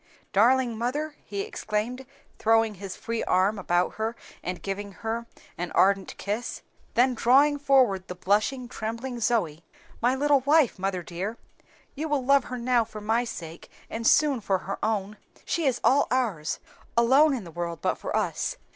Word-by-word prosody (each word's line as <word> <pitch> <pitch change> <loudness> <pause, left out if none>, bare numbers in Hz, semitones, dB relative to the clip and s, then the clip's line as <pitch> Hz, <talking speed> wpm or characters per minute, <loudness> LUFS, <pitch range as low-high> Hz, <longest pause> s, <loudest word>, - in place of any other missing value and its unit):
"Darling 240 +3 +4
mother!" 290 +6 -2
he 200 -1 -4
exclaimed, 235 +7 -3 0.3
throwing 225 0 +3
his 195 -1 -7
free 230 0 -3
arm 195 +3 +2
about 175 0 0
her 220 +1 -2 0.3
and 180 0 -5
giving 200 0 -4
her 225 +5 -4 0.3
an 175 0 -3
ardent 195 0 +2
kiss. 210 +5 -4 0.3
Then 250 +2 +4
drawing 280 +5 +4
forward 255 -10 +3
the 180 - -6
blushing, 215 +8 0
trembling 235 +2 -5
Zoe. 175 -10 0 0.4
"My 245 +3 +3
little 285 +1 +3
wife, 285 -4 +3
mother 190 -2 -2
dear 190 +7 -5 0.6
you 310 +3 -4
will 280 -3 0
love 275 0 +4
her 250 - -5
now 240 0 +2
for 215 -1 -9
my 220 +3 +1
sake, 165 -7 -8 0.2
and 230 +1 -1
soon 285 -6 +4
for 195 -1 +1
her 195 +2 -6
own. 210 -1 -1 0.3
She 330 -4 0
is 255 -2 +1
all 280 +2 +4
ours 210 -13 0 0.4
alone 270 +5 +5
in 235 - -5
the 170 - -10
world 170 -1 -4
but - - -1
for - - -4
us." - - -1
225 Hz, 165 wpm, -26 LUFS, 195-255 Hz, 0.6 s, alone